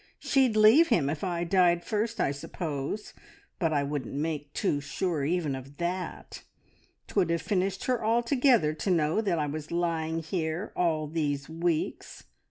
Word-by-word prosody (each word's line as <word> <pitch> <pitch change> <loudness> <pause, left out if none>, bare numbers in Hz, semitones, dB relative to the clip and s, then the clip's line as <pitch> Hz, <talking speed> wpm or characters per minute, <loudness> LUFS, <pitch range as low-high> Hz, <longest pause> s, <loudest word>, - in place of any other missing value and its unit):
She'd 260 -5 +2
leave 220 +10 +7
him 145 - +2
if 150 - -5
I 175 -2 -1
died 175 -1 +3
first, 225 +1 -2
I - - +2
suppose, 145 +5 -5 0.5
but 165 -4 +1
I 145 -2 +1
wouldn't 140 -3 -4
make 145 -1 -3
too 145 -1 0
sure 155 +1 -2
even 160 -1 0
of 135 +2 -8
that. 180 +2 -4 0.6
'Twould 185 -5 +1
have 170 -1 0
finished 190 -2 -1
her 250 -3 0
altogether 235 - +3
to 155 +5 -3
know 165 +2 +2
that 190 -6 0
I 150 - 0
was 150 +1 -5
lying 165 -1 -1
here 160 +2 -3
all 160 -3 +1
these 145 -3 -2
weeks. 165 0 -2
170 Hz, 160 wpm, -28 LUFS, 150-195 Hz, 0.6 s, leave